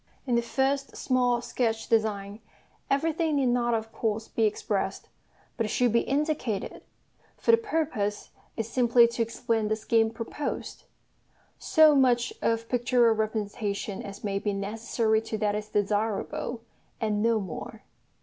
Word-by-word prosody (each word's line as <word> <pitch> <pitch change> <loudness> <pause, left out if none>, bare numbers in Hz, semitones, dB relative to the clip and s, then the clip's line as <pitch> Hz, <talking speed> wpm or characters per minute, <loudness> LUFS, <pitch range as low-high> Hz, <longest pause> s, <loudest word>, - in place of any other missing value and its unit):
In 250 - -1
the 235 - +3
first 270 +3 -1
small 245 -2 +1
sketch 230 -2 -1
design, 210 -2 0 0.5
everything 315 +2 +1
need 270 -3 +2
not 240 -1 +2
of 225 0 -4
course 220 -1 -2
be 225 - +1
expressed; 205 -2 -2 0.5
but 225 - 0
it - - -6
should 245 +2 +2
be 235 - +5
indicated 275 -8 -2 0.6
for - - +3
the 460 - +7
purpose 305 - -2 0.3
is 225 -2 -2
simply 240 0 +5
to 235 0 -3
explain 230 -1 -1
the 215 - +1
scheme 225 +1 +2
proposed: 230 +6 -5 0.7
so 315 -3 +5
much 250 -3 +3
of 230 0 0
pictorial 245 -1 +3
representation 210 -2 -3
as 200 0 -9
may 200 -1 -1
be 205 0 -1
necessary 220 +2 0
to 225 -1 -4
that 210 -1 0
is 210 0 -3
desirable, 210 +3 -1 0.4
and 210 -2 0
no 230 0 +3
more. 185 -5 -7
225 Hz, 145 wpm, -27 LUFS, 215-245 Hz, 0.7 s, the